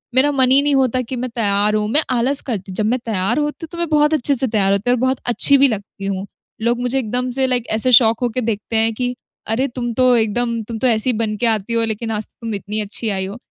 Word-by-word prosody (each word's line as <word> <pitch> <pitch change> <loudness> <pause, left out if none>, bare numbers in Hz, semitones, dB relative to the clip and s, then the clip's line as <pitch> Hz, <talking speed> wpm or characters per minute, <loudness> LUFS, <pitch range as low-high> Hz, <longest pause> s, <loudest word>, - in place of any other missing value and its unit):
मेरा 280 +3 +4
मन 260 -2 +2
ही 275 +2 +6
नहीं 290 0 +1
होता 255 -1 +1
कि 250 +1 -6
मैं 250 +1 -4
तैयार 210 -2 +2
हूँ 210 0 0
मैं 300 - +4
आलस 255 +3 +1
करती 195 -4 -4
हूँ। - - -8
जब 215 - -1
मैं 255 - 0
तैयार 195 +1 0
होती 295 +2 -3
हूँ - - -15
तो 340 - -8
मैं 340 -1 -2
बहुत 300 0 +3
अच्छे 285 -1 +1
से 260 +1 +2
तैयार 205 -4 +1
होती 200 +4 -1
हूँ 245 - +4
और - - -4
बहुत 260 0 0
अच्छी 275 +3 +5
भी 275 +1 +5
लगती 200 -3 -6
हूँ। 195 0 -3 0.4
लोग 235 +1 0
मुझे 250 +2 0
एकदम 250 +2 -2
से 265 - +2
लाइक 245 -2 -1
ऐसे 255 +3 +1
शॉक 230 -2 +5
हो 245 - +1
के - - +1
देखते 225 -1 -3
हैं 225 0 +2
कि 245 +2 -3 0.3
अरे! 245 +5 0
तुम 240 -2 -4
तो 255 0 +3
एकदम 230 +1 0
तुम 230 - -5
तो 260 - +1
ऐसी 230 +2 +2
बन 215 -1 -2
के 240 - -1
आती 220 0 -1
हो 230 - +2
लेकिन 225 +1 -4
आज 215 -1 -3
तक - - -30
तुम 225 -1 -4
इतनी 210 +2 -4
अच्छी 215 +2 -3
आयी 190 -2 -1
हो। 200 +5 -7
235 Hz, 280 wpm, -18 LUFS, 215-255 Hz, 0.4 s, ही